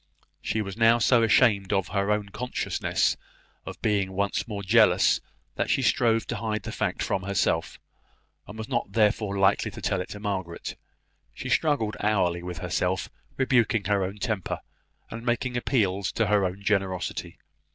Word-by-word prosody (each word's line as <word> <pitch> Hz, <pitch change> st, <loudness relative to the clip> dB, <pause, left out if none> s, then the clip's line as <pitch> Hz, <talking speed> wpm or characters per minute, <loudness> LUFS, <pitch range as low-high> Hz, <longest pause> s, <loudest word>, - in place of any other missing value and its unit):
She 110 Hz, -, -1 dB
was 95 Hz, 0 st, -7 dB
now 115 Hz, 0 st, +5 dB
so 120 Hz, +1 st, +4 dB
ashamed 105 Hz, -3 st, +4 dB
of 95 Hz, -3 st, 0 dB
her 100 Hz, 0 st, 0 dB
own 105 Hz, -1 st, 0 dB
consciousness 125 Hz, +5 st, -1 dB, 0.5 s
of -, -, -7 dB
being 100 Hz, -3 st, +1 dB
once 100 Hz, +4 st, -1 dB
more 100 Hz, -3 st, -5 dB
jealous, 100 Hz, -2 st, +4 dB, 0.4 s
that -, -, -1 dB
she -, -, +2 dB
strove 115 Hz, -2 st, +2 dB
to -, -, -4 dB
hide 110 Hz, -3 st, -2 dB
the -, -, -5 dB
fact -, -, -2 dB
from 95 Hz, -, -1 dB
herself; 95 Hz, -4 st, -1 dB, 0.7 s
and 105 Hz, -, -9 dB
was 110 Hz, -, -5 dB
not 120 Hz, -6 st, -2 dB
therefore 105 Hz, -2 st, +2 dB
likely 95 Hz, +1 st, +3 dB
to -, -, -10 dB
tell 95 Hz, -, -1 dB
it 90 Hz, -, -7 dB
to 105 Hz, -, -7 dB
Margaret. 95 Hz, -5 st, -4 dB, 0.6 s
She -, -, -6 dB
struggled 140 Hz, -9 st, +1 dB
hourly 95 Hz, -5 st, +1 dB
with 90 Hz, -1 st, -6 dB
herself, 90 Hz, +2 st, -1 dB, 0.3 s
rebuking 120 Hz, -5 st, +2 dB
her 100 Hz, -2 st, +1 dB
own 95 Hz, +3 st, -4 dB
temper, 105 Hz, -4 st, -3 dB, 0.5 s
and 115 Hz, +1 st, -6 dB
making 120 Hz, +1 st, -1 dB
appeals 100 Hz, -7 st, 0 dB
to 115 Hz, -, +1 dB
her 105 Hz, -1 st, +3 dB
own 95 Hz, +2 st, -4 dB
generosity. 95 Hz, -3 st, -1 dB
105 Hz, 165 wpm, -26 LUFS, 95-115 Hz, 0.7 s, now